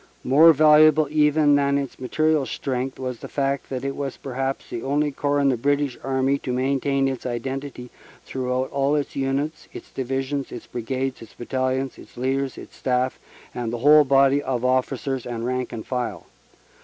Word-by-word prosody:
More 150 +6 +7
valuable 155 0 +6
even 150 -1 +4
than 140 0 +3
its 140 -2 -4
material 155 +2 +1
strength 130 -1 -3
was 130 -3 -5
the - - -8
fact 140 -1 -2
that 130 0 -4
it 135 - -2
was 140 -2 -4
perhaps 135 +1 -4
the 115 - -5
only 145 +3 0
corps 145 +1 0
in 140 -1 +3
the 130 - +1
British 140 +1 0
Army 135 +1 +1
to 130 - -4
maintain 135 +1 +1
its 130 -2 -3
identity 125 +1 -5 0.3
through 130 -1 -3
out 130 +1 -1
all 140 +1 +1
its 145 -1 -2
units 140 +3 -2
its - - -10
Divisions, 135 +2 -3
its 120 - -8
Brigades, 130 +2 -3
its 115 - -13
Battalions, 130 +1 -2
its - - -15
leaders, 135 +2 -1
its - - -11
staff 130 0 -1 0.3
and 120 -2 -3
the 120 - -3
whole 150 +1 +8
body 140 0 +4
of 130 -3 -2
officers 130 0 -1
and 120 -1 -4
rank 125 0 -2
and 115 -2 -6
file. 125 -2 -3
135 Hz, 180 wpm, -23 LUFS, 130-140 Hz, 0.3 s, whole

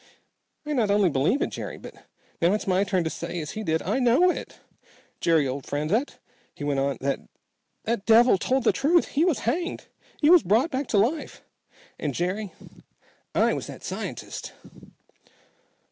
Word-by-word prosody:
"I 300 - -2
not 230 -7 +1
only 200 -3 +3
believe 145 - +1
it, - - -3
Jerry, - - -6
but - - -11 0.5
now 170 +3 +4
it's 210 -1 -2
my 190 0 +2
turn 190 -3 0
to 160 - -1
say, 175 0 -5
as 150 -2 -5
he 220 - -5
did, 160 -6 -1
I 210 +9 0
know 260 +9 +4
it! - - -7 0.6
Jerry, 160 -4 +3
old 135 +1 -5
friend," 155 - 0 0.5
he - - -8
went 145 -1 0
on, 140 0 0 0.9
"that 225 -2 -1
devil 230 -2 +6
told 260 +5 0
the - - +4
truth. 320 +5 +2
He 295 - +1
was 350 -6 +1
hanged. 340 +10 -2 0.3
He 300 +2 +5
was 355 -2 +8
brought 225 - +2
back 265 0 -2
to 210 - +1
life; 250 +11 0 0.6
and 145 -4 -3
Jerry 185 +3 -2 0.8
I - - +3
was - - -4
that - - -10
scientist!" - - -6
210 Hz, 170 wpm, -25 LUFS, 170-265 Hz, 0.9 s, was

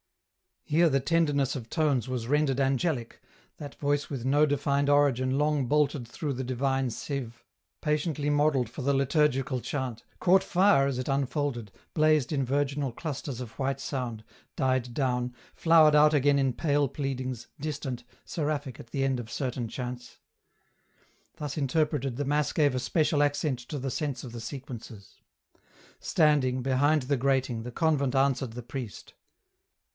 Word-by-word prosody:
Here 165 +2 +3
the 135 -2 +1
tenderness 145 -3 +1
of 120 -4 -6
tones 145 -8 +1
was 125 -3 -3
rendered 145 -1 +2
angelic, 135 -2 0 0.4
that 145 -1 -8
voice 145 0 -1
with 130 -4 -4
no 145 +3 +4
defined 140 0 +1
origin 135 -2 +3
long 150 -3 +1
bolted 145 -3 +1
through 140 +4 -4
the 130 0 -4
divine 135 +1 0
sieve, 120 -1 -5 0.4
patiently 150 -1 0
modelled 145 -5 +2
for 130 - -7
the 140 +2 +1
liturgical 135 -1 +1
chant, 130 -3 -4 0.2
caught 190 +1 +4
fire 185 -7 +4
as 135 -2 -2
it 130 +2 -3
unfolded, 135 -5 -1 0.2
blazed 155 -3 +3
in 140 -3 0
virginal 140 0 0
clusters 140 -2 -5
of 120 -3 -7
white 135 0 -1
sound, 120 -5 -4 0.3
died 130 -3 0
down, 125 -2 -1 0.2
flowered 160 -2 +5
out 150 +1 +6
again 145 0 +3
in 135 -2 +1
pale 145 +1 +1
pleadings, 130 -3 -4
distant, 140 -4 -4 0.2
seraphic 145 -5 -3
at - - -10
the 135 - -1
end 135 -2 +1
of 115 -2 -7
certain 125 -2 -3
chants. 125 +1 -6 1.2
Thus 150 -1 -5
interpreted 140 -2 0
the 145 +3 -2
Mass 145 +1 +1
gave 145 -4 +3
a 130 - 0
special 150 +3 +1
accent 145 -2 +1
to 150 - -4
the 135 -1 -3
sense 140 -3 -3
of 125 - -7
the 120 -1 -7
sequences. 115 -4 -9 0.8
Standing, 135 -5 +2
behind 140 +3 +2
the 140 +2 0
grating, 130 -3 0
the 125 - -6
convent 140 -4 +1
answered 135 -3 +1
the 120 +1 -7
priest. 120 -2 -7
135 Hz, 155 wpm, -28 LUFS, 125-145 Hz, 1.2 s, out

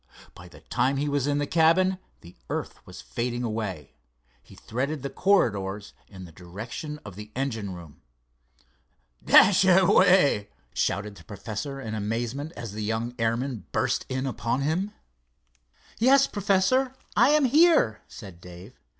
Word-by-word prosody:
By - - -13
the - - -16
time 135 +2 0
he 145 +2 -1
was 145 -1 0
in 145 0 +1
the 145 - 0
cabin 170 +4 +3 0.2
the 85 - -15
earth - - -4
was 90 0 -11
fading 120 0 -3
away. 110 - -4 0.5
He - - -17
threaded 135 +4 -4
the 140 - -4
corridors 105 - 0
in 95 -2 -11
the 85 - -13
direction 110 - -8
of 100 -3 -9
the 105 +1 -10
engine 115 -8 -3
room. 85 -4 -13 1.2
"Dashaway!" 185 - +5 0.3
shouted 100 0 -2
the - - -14
professor 110 +6 -6
in 110 -5 -6
amazement, 115 +8 -3
as 115 -3 -7
the 110 - -5
young 110 +3 -2
airman 115 0 -2
burst - - -1
in 130 +1 -2
upon 125 0 -2
him. 170 +8 -1 1.1
"Yes, 270 +4 +5
Professor, 205 +6 +1 0.2
I - - +5
am 300 -1 +4
here," 300 - +4
said 95 -5 -12
Dave. 90 +6 -13
125 Hz, 140 wpm, -26 LUFS, 105-170 Hz, 1.2 s, Dashaway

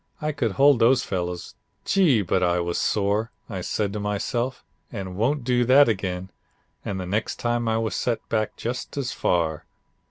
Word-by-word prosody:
I 150 0 -1
could 120 -8 -1
hold 140 0 +5
those 120 +3 +4
fellows. 90 -2 -4 0.3
Gee! 155 - +3
but 90 +1 +1
I 90 -1 +2
was 85 0 -1
sore. 105 +2 0 0.2
I 95 -4 -5
said 100 +2 -2
to 105 - -3
myself, 120 +5 -2 0.3
you 100 -5 -5
won't 120 +9 0
do 125 0 +2
that 135 +4 +7
again, 95 -3 -2 0.5
and 95 -2 -3
the 90 - -4
next 105 +4 -1
time 120 -1 -1
I 110 0 +2
was 115 -1 -1
set 120 -2 -2
back 110 -1 -1
just 125 +4 -5
as 130 -3 -1
far. 80 -3 0
110 Hz, 180 wpm, -24 LUFS, 95-125 Hz, 0.5 s, that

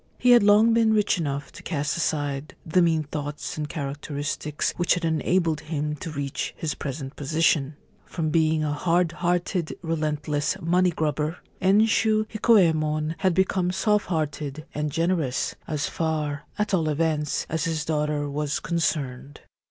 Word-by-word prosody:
He 250 - +4
had 240 - +8
long 210 +3 +5
been 225 -1 +4
rich 210 -2 +2
enough 140 -3 -3
to - - -12
cast 150 -4 -2
aside 145 -3 -2
the 170 +3 +3
mean 165 -2 +2
thoughts 145 0 -5
and 150 -1 -4
characteristics 145 +1 -3
which 175 0 +2
had 175 -1 -2
enabled 165 0 +1
him 150 -1 -3
to 165 - -6
reach 140 -1 -4
his 160 -4 -2
present 135 0 -6
position. 150 0 +1 0.3
From 155 -3 -2
being 160 -1 +2
a 150 -1 0
hard 170 +2 +1
hearted 175 0 -1
relentless 150 -2 -1
money 180 +2 +2
grubber, 155 0 -1 0.2
Enshu 215 +2 +3
Hikoyemon 160 -8 +3
had 190 -3 +2
become 190 -1 +2
soft 210 +2 +1
hearted 155 -2 -3
and 150 0 -2
generous 165 -5 0
— - - -33
as 150 -2 -1
far, 150 -3 -2
at 210 -1 -1
all 165 -4 +2
events, 150 -1 0
as 160 -1 -1
his 160 -2 -1
daughter 150 -1 0
was 145 +1 -2
concerned. 145 -5 -2
155 Hz, 150 wpm, -25 LUFS, 150-175 Hz, 0.3 s, had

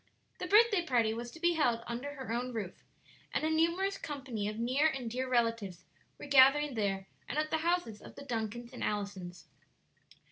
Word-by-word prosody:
The 360 - -3
birthday 415 -1 +5
party 235 -8 +2
was 235 +1 -5
to 325 - -12
be 345 +1 +3
held 240 -8 +1
under 255 +5 -5
her 260 -4 -5
own 250 +1 -2
roof, 200 -5 -4 0.6
and - - -1
a 315 - +1
numerous 340 +5 +1
company 260 -8 -4
of 210 +1 -4
near 255 +6 +2
and 265 -6 -3
dear 255 +2 -2
relatives 230 -7 0 0.3
were - - -9
gathering 280 +1 +6
there 195 -4 -1 0.2
and - - -3
at 310 0 0
the 320 - +1
houses 335 -10 -1
of - - -12
the 280 - -10
Duncans 235 0 -4
and 250 - -6
Allisons. 200 -4 -4
250 Hz, 185 wpm, -32 LUFS, 225-310 Hz, 0.6 s, gathering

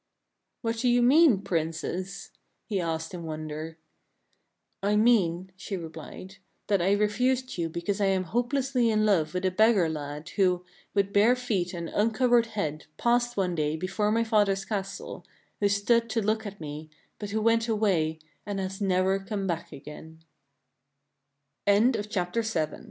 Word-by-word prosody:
" - - -55
What 225 0 -1
do 250 - +1
you 245 0 +4
mean, 260 - +5
Princess? 170 +3 -3 0.2
" - - -49
he 200 -4 0
asked 165 0 -3
in 175 - -6
wonder. 155 0 -6 0.5
" - - -47
I - - +3
mean," 190 -5 +3
she 195 +1 -5
replied, 165 +3 -9
" - - -46
that 200 -3 +3
I 190 +3 +3
refused 250 +5 +1
you 165 -1 -1
because 170 +5 -3
I 200 - +3
am 190 -1 +1
hopelessly 245 - 0
in 215 -1 +2
love 180 -6 +2
with 180 +1 -1
a 185 - +2
beggar 210 -2 +4
lad, 150 -1 -5
who, 180 -3 +1 0.3
with 200 0 +1
bare 215 +5 +5
feet 210 -8 -1
and 170 -1 -4
uncovered 230 +3 +2
head, 155 -9 -4
passed 240 0 +1
one 185 -2 +1
day 155 -2 0
before 190 +5 -1
my 230 +1 +2
father's 205 -3 +2
castle, 200 -3 -5 0.4
who 205 - +2
stood 230 +4 +2
to 225 +1 0
look 220 0 0
at 205 0 -9
me, 155 0 -7 0.3
but 205 - -5
who 215 +2 -1
went 230 +1 +2
away, 190 -8 +1
200 Hz, 145 wpm, -27 LUFS, 170-225 Hz, 0.5 s, mean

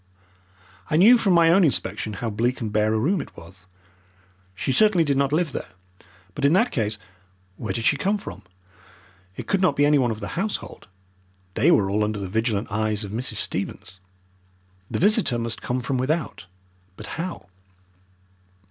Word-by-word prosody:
I - - 0
knew 205 +10 +7
from 195 -5 +2
my 165 -1 +5
own 190 +3 +5
inspection 125 -7 -1
how 115 +3 -4
bleak 120 +5 -1
and 110 -4 -4
bare 110 0 +2
a 110 - +1
room 160 - +1
it - - -12
was. 90 +2 -14 0.9
She 105 - -2
certainly 210 +1 +4
did 145 -3 0
not 140 0 +1
live 160 0 +1
there. - - -7 0.6
But - - -6
in 140 +2 +4
that 230 +6 +3
case 110 -4 -1 0.6
where 105 -1 -5
did 115 - -3
she 145 - +3
come 200 +8 0
from? - - -9 1.0
It - - -6
could 195 -2 0
not 170 -7 +3
be 145 - +3
anyone 145 -4 +3
of 110 -1 -4
the - - -6
household. 200 +5 -4 0.7
They 130 - +3
were 105 - +4
all 105 +2 0
under 105 0 -2
the 100 -1 -4
vigilant 110 +1 -1
eyes 110 0 -1
of 100 - -7
Mrs. 120 +4 -4
Stevens. 90 +1 -4 0.9
The - - -2
visitor 205 - +3
must 115 0 -4
come 125 +1 -2
from 130 +1 -2
without. 145 - -2 0.5
But - - -8 0.2
how? 180 - -6
125 Hz, 175 wpm, -23 LUFS, 110-170 Hz, 1.0 s, knew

